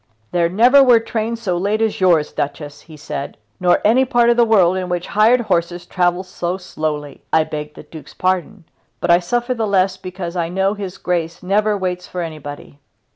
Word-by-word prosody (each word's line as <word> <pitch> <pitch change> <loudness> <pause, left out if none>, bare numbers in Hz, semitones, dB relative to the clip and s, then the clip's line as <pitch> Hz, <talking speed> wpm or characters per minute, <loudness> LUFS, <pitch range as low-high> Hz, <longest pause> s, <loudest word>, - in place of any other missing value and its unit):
"There 170 -1 +1
never 245 +9 +5
were 245 -3 +6
trains 230 0 -4
so 180 -4 0
late 205 +4 0
as 220 -3 -1
yours, 170 -5 +3
Duchess," 145 0 -5
he 155 -2 -14
said, 140 -1 -6 0.2
"nor 180 -1 +3
any 235 +5 +5
part 240 -2 +3
of - - +2
the 240 - +6
world 195 -6 +4
in 185 -1 -3
which 175 0 -2
hired 225 +4 +4
horses 175 -4 -1
travel 175 0 0
so 180 -1 -4
slowly. 155 -5 -5
I 160 - +4
beg 150 -1 -7
the - - -11
Duke's 155 -1 -13
pardon, 185 +1 -1 0.4
but 175 - +1
I 170 - +6
suffer 240 +7 -1
the 225 -3 -2
less 190 -1 +1
because 185 -2 -7
I 170 -2 -1
know 190 +2 0
his 195 -2 -7
Grace 170 -3 -3
never 205 +3 +1
waits 180 -2 -3
for 180 - -5
anybody." 145 -3 -9
185 Hz, 195 wpm, -19 LUFS, 170-215 Hz, 0.4 s, were